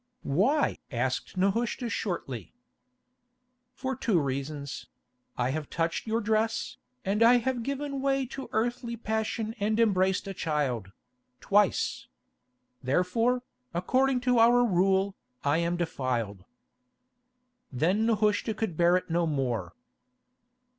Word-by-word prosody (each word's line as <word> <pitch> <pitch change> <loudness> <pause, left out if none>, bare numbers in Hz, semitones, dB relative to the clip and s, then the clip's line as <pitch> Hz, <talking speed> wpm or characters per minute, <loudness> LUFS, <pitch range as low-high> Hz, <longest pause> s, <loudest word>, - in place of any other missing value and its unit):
"Why?" 225 - +2
asked 130 +7 -2
Nehushta 225 +6 0
shortly. 165 - -4 1.2
"For 265 0 -3
two 215 -7 +2
reasons: 140 0 -4 0.5
I 125 +1 +1
have 150 0 -4
touched 165 +5 -1
your 225 +1 +1
dress, 225 +3 0 0.3
and 205 +3 0
I 240 +2 +7
have 245 0 -1
given 275 +2 -3
way 270 -1 +1
to 270 +2 -7
earthly 235 +1 -1
passion 220 0 -2
and 215 +2 +1
embraced 190 -4 +2
a 195 - -4
child—twice. 125 - -1 0.7
Therefore, 205 - +1 0.3
according 255 +8 +2
to 250 -1 +3
our 240 +2 +6
rule, 190 0 +2 0.3
I 145 +3 +2
am 170 +1 0
defiled." 120 - -2 1.3
Then 180 - +1
Nehushta 215 0 +1
could 215 -6 -2
bear 175 +2 +4
it 180 - -5
no 170 0 +2
more. 120 - -2
195 Hz, 115 wpm, -28 LUFS, 150-235 Hz, 1.3 s, I